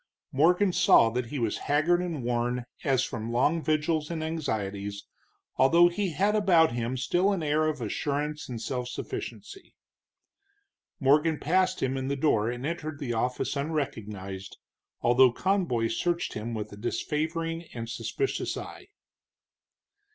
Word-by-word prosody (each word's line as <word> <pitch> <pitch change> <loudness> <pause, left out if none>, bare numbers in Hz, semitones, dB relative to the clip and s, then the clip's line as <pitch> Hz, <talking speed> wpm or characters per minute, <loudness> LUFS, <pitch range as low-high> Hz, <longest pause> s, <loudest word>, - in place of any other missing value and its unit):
Morgan 180 +7 +3
saw 115 - +5
that 125 +1 -2
he 145 - -5
was 115 -4 -1
haggard 155 +5 +3
and 165 -7 -3
worn 120 +1 -1 0.2
as 135 -2 +2
from 115 -3 -4
long 145 +8 +2
vigils 155 0 0
and 165 -2 -3
anxieties, 100 -10 -3 0.5
although 170 +7 +6
he 195 +2 -1
had 200 +7 +1
about 175 -8 +4
him 120 +2 -2
still 175 +10 +2
an 190 -5 -1
air 155 +1 +2
of 150 -4 -2
assurance 145 +6 -2
and 120 -2 -4
self 125 +1 -3
sufficiency. 390 - -7 1.2
Morgan 150 +2 +3
passed 185 +4 +1
him 130 0 0
in 130 0 -3
the 140 - 0
door 125 -7 +2
and 120 +2 -4
entered 155 -2 -4
the 135 -5 -3
office 125 +5 -1
unrecognized, 105 -10 -4 0.4
although 125 +1 +5
Conboy 170 - 0
searched 170 +9 -1
him 115 +2 -4
with 105 -1 -5
a - - -10
disfavoring 160 +8 -2
and 115 -1 -6
suspicious 390 - -2
eye. 385 - -9
145 Hz, 145 wpm, -28 LUFS, 120-165 Hz, 1.2 s, although